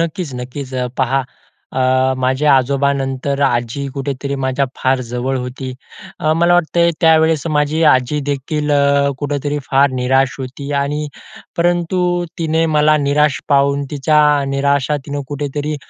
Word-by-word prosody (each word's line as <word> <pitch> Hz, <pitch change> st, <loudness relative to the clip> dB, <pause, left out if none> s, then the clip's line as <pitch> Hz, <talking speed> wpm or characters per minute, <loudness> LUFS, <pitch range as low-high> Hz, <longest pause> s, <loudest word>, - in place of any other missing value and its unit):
नक्कीच, 165 Hz, -3 st, -3 dB
नक्कीच. 130 Hz, +2 st, -7 dB
अ, 125 Hz, -1 st, -1 dB
पहा 135 Hz, +1 st, +1 dB, 0.5 s
अ, 130 Hz, 0 st, +2 dB
माझ्या 130 Hz, +3 st, +2 dB
आजोबांनंतर 140 Hz, +1 st, 0 dB
आजी 120 Hz, +3 st, -2 dB
कुठेतरी 140 Hz, 0 st, -3 dB
माझ्या 130 Hz, +1 st, +1 dB
फार 130 Hz, 0 st, +1 dB
जवळ 125 Hz, +2 st, -2 dB
होती. 130 Hz, +1 st, -6 dB, 0.5 s
अ, 155 Hz, -, +2 dB
मला 170 Hz, +2 st, +3 dB
वाटतंय 170 Hz, 0 st, +2 dB
त्यावेळेस 160 Hz, -1 st, +3 dB
माझी 150 Hz, +2 st, +1 dB
आजी 130 Hz, +3 st, +1 dB
देखील 150 Hz, +2 st, -2 dB, 0.5 s
कुठेतरी 145 Hz, 0 st, -2 dB
फार 140 Hz, +1 st, +4 dB
निराश 130 Hz, +1 st, +1 dB
होती 135 Hz, +2 st, -7 dB
आणि 150 Hz, +2 st, -2 dB, 0.5 s
परंतु 175 Hz, +1 st, +1 dB, 0.4 s
तिने 160 Hz, 0 st, +1 dB
मला 150 Hz, 0 st, +4 dB
निराश 145 Hz, -1 st, +1 dB
पाहून 140 Hz, 0 st, +2 dB
तिच्या 150 Hz, +1 st, +2 dB, 0.3 s
निराशा 140 Hz, +1 st, +1 dB
तिनं 145 Hz, 0 st, -3 dB
कुठेतरी 145 Hz, +1 st, -3 dB
140 Hz, 130 wpm, -17 LUFS, 130-150 Hz, 0.5 s, फार